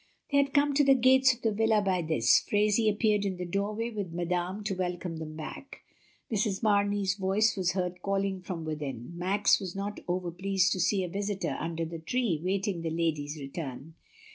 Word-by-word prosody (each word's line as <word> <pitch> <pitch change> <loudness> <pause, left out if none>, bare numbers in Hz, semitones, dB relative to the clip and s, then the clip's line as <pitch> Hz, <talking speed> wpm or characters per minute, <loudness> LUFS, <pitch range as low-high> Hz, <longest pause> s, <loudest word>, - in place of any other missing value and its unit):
'' - - -36
They 280 - +3
had 280 -1 +2
come 285 0 +4
to 290 +1 +4
the 270 -1 +6
gates 260 +1 +5
of 245 -1 -8
the 225 - +2
villa 220 +1 +3
by 190 -3 +1
this; 155 -8 +3
Fhraisie 210 +1 +3
appeared 210 -1 +1
in 190 -2 -2
the 180 - -4
doorway 210 +5 -2
with 200 -6 -4
Madame 175 +3 -2
to 200 -1 -1
welcome 180 -2 -3
them 155 -1 -7
back. 160 - -8 0.5
Mrs. 210 -1 0
Mamey's 205 -2 +2
voice 195 +3 +1
was 185 -2 0
heard 180 -1 -3
calling 195 -1 -1
from 175 -3 -5
within. 145 -4 -5
Max 190 +4 +2
was 190 -3 -6
not 200 +1 -4
over 180 -1 -2
pleased 190 +1 +1
to 185 - 0
see 190 +2 +2
a - - -2
visitor 200 +2 -2
under 165 0 -3
the 165 0 -6
tree 180 -2 -1
waiting 190 -1 -1
the 165 - -2
ladies' 160 -2 -1
return. 140 +1 -7
190 Hz, 195 wpm, -29 LUFS, 170-210 Hz, 0.5 s, the